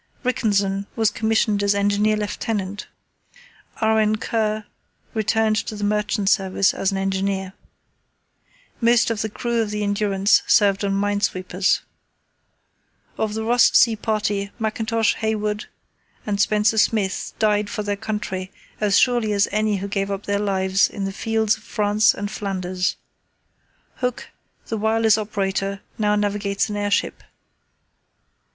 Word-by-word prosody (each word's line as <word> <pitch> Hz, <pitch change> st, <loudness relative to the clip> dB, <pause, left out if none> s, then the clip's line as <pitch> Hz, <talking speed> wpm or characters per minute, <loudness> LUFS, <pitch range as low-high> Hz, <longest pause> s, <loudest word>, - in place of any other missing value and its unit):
Rickenson 200 Hz, -5 st, 0 dB
was 220 Hz, -2 st, +2 dB
commissioned 220 Hz, -2 st, +1 dB
as 200 Hz, 0 st, +2 dB
Engineer 205 Hz, +1 st, +2 dB
Lieutenant, 205 Hz, -1 st, -3 dB, 0.9 s
R.N. 220 Hz, -1 st, +3 dB
Kerr 215 Hz, -1 st, -1 dB, 0.5 s
returned 220 Hz, 0 st, +1 dB
to 215 Hz, -, -3 dB
the 205 Hz, -, -5 dB
Merchant 210 Hz, 0 st, 0 dB
Service 195 Hz, -1 st, +2 dB
as 195 Hz, -, 0 dB
an 195 Hz, -, -2 dB
engineer. 195 Hz, 0 st, -2 dB, 1.3 s
Most 235 Hz, 0 st, +4 dB
of 220 Hz, -2 st, -2 dB
the 220 Hz, -, -2 dB
crew 235 Hz, +2 st, -1 dB
of 220 Hz, -, -2 dB
the 210 Hz, 0 st, -2 dB
Endurance 200 Hz, -1 st, +2 dB
served 200 Hz, -2 st, +4 dB
on 195 Hz, -1 st, 0 dB
minesweepers. 200 Hz, -2 st, 0 dB, 1.4 s
Of 215 Hz, -1 st, -1 dB
the 220 Hz, -, -2 dB
Ross 240 Hz, +2 st, +4 dB
Sea 230 Hz, -2 st, +5 dB
Party, 210 Hz, -2 st, -1 dB
Mackintosh, 220 Hz, 0 st, 0 dB
Hayward, 215 Hz, 0 st, -2 dB, 0.6 s
and 205 Hz, -1 st, 0 dB
Spencer 210 Hz, +1 st, +2 dB
Smith 210 Hz, -3 st, 0 dB
died 210 Hz, -2 st, +1 dB
for 210 Hz, -, -3 dB
their 205 Hz, 0 st, -1 dB
country 200 Hz, -3 st, -4 dB, 0.3 s
as 205 Hz, -2 st, +3 dB
surely 240 Hz, -4 st, +2 dB
as 200 Hz, 0 st, +2 dB
any 215 Hz, 0 st, +1 dB
who 195 Hz, +1 st, -4 dB
gave 195 Hz, 0 st, -2 dB
up 200 Hz, 0 st, -4 dB
their 200 Hz, 0 st, 0 dB
lives 190 Hz, -1 st, +2 dB
on 200 Hz, -, -5 dB
the 195 Hz, -, -2 dB
fields 220 Hz, 0 st, 0 dB
of 215 Hz, -, -19 dB
France 210 Hz, -1 st, +2 dB
and 205 Hz, +1 st, -4 dB
Flanders. 185 Hz, -3 st, -2 dB, 1.0 s
Hooke, 250 Hz, -1 st, -3 dB, 0.4 s
the 225 Hz, -, -3 dB
wireless 220 Hz, 0 st, +3 dB
operator, 195 Hz, -2 st, -2 dB, 0.2 s
now 210 Hz, -1 st, +2 dB
navigates 205 Hz, 0 st, -1 dB
an -, -, -3 dB
airship. 205 Hz, 0 st, -1 dB
210 Hz, 135 wpm, -22 LUFS, 200-220 Hz, 1.4 s, Sea